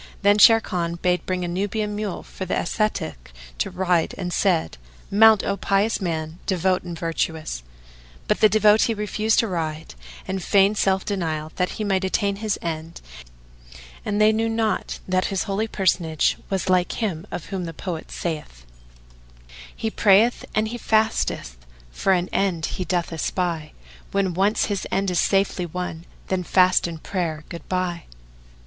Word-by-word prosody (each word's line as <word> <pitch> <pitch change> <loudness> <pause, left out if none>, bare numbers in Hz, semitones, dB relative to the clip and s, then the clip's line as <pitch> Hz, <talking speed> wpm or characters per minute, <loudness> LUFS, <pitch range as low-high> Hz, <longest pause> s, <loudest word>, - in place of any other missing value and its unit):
Then 205 +1 +5
Sharrkan 180 -7 +4
bade 180 0 +1
bring 185 -1 -1
a - - -3
Nubian 205 +4 -2
mule 210 -3 -4
for 190 - -7
the 185 - -1
ascetic 170 - -2 0.3
to - - 0
ride 180 -3 0
and 180 -2 -3
said, 170 - +1 0.3
"Mount, 220 +1 +6
O 200 - 0
pious 200 +3 +1
man, 160 -2 -3
devout 185 0 +1
and 175 -1 -7
virtuous!" 160 - -2 0.7
But - - +1
the 215 - +6
devotee 215 +2 +4
refused 210 +1 0
to 230 - -2
ride 160 -4 -4 0.3
and 190 0 -2
feigned 200 +2 +3
self 190 0 +2
denial, 160 -6 -2
that 180 0 0
he 215 - -2
might 195 -2 +1
attain 200 +1 0
his 215 -1 -1
end; 165 0 -5 1.0
and 205 0 -1
they 215 0 +6
knew 225 +1 0
not 225 -1 -1
that 185 0 +1
this 195 -2 -1
holy 200 +3 -1
personage 170 -6 +1
was 195 -1 -1
like 180 -1 +2
him 185 -8 -3
of 170 - -5
whom 185 -2 -2
the 165 - -5
poet 165 0 -6
saith, 150 - -5 1.1
"He 220 - -3
prayeth 215 +4 +4
and 215 0 +1
he 240 +1 -5
fasteth 215 - 0 0.3
for 195 - 0
an 180 -1 +1
end 185 -5 0
he 185 - -4
doth 175 0 -1
espy; 165 -1 -2 0.2
* - - -22
When 195 -2 +1
once 195 +5 +2
his 205 -3 -3
end 195 -1 0
is 175 - +1
safely 195 -2 +1
won 170 -1 -5 0.2
then 190 -1 0
fast 185 0 +4
and 165 -2 -8
prayer 165 -5 -2
good 170 - -9
bye." 180 -2 -2
185 Hz, 165 wpm, -23 LUFS, 170-205 Hz, 1.1 s, Mount